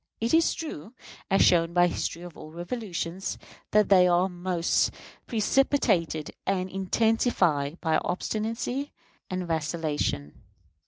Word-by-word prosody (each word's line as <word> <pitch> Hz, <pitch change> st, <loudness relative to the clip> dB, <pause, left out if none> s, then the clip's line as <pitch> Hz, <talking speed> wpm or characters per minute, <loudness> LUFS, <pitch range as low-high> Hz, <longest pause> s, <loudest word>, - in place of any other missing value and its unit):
It 230 Hz, +5 st, -1 dB
is 325 Hz, 0 st, +4 dB
true, 235 Hz, -, -7 dB, 0.3 s
as 195 Hz, -, +4 dB
shown 170 Hz, -1 st, +4 dB
by 175 Hz, 0 st, +5 dB
the 175 Hz, -, -1 dB
history 170 Hz, -, -3 dB
of 175 Hz, -2 st, -10 dB
all 155 Hz, -, -10 dB
revolutions, 175 Hz, 0 st, -4 dB, 0.3 s
that 210 Hz, -1 st, +3 dB
they 185 Hz, -2 st, +6 dB
are 175 Hz, +1 st, +3 dB
most 175 Hz, -2 st, 0 dB, 0.4 s
precipitated 215 Hz, -, +1 dB
and 185 Hz, -1 st, -1 dB
intensified 190 Hz, -, +1 dB
by 160 Hz, -2 st, +2 dB
obstinacy 230 Hz, +8 st, -3 dB, 0.4 s
and 185 Hz, -1 st, -3 dB
vacillation. 155 Hz, -, -2 dB
180 Hz, 120 wpm, -27 LUFS, 165-215 Hz, 0.4 s, they